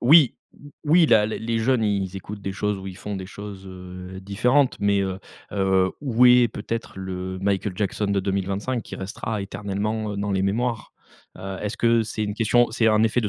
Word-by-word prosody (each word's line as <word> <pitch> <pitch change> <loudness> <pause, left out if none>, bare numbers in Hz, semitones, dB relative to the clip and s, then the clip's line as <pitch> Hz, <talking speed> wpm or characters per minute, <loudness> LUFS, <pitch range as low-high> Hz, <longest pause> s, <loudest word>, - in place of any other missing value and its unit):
oui 140 +1 +7 0.5
oui 160 +2 +5
la 105 -5 +5
les 110 - -3
les 115 0 -1
jeunes, 115 0 +2
ils 100 -2 -1
écoutent 100 +2 -7
des 95 0 -4
choses 105 +1 -1
où 95 - -8
ils 95 -1 -7
font 105 0 -5
des 95 -1 -6
choses, 100 -1 -9
heu, 90 0 -9
différentes, 125 +8 +2
mais, 100 -1 +3
heu, 95 -1 -3 0.3
heu, 95 -2 +2
où 125 -4 +3
est 125 -1 +7
peut-être 115 -1 -5
le 95 0 -4
Michael 100 -1 0
Jackson 105 +1 -1
de 100 -1 +1
2025 100 +5 -2
qui - - -8
restera 100 +2 -4
éternellement, 105 +2 -3
heu, - - -5
dans 100 0 -1
les 95 - +1
mémoires? 115 +3 -1 0.5
Heu, 95 0 -6
est-ce 105 +1 -3
que 115 -1 +3
c'est 110 0 -4
une 105 - -2
question, 120 +1 +3
c'est 115 0 +1
un 110 0 +4
effet 115 +2 +2
de 105 - -1
105 Hz, 205 wpm, -24 LUFS, 95-115 Hz, 0.5 s, oui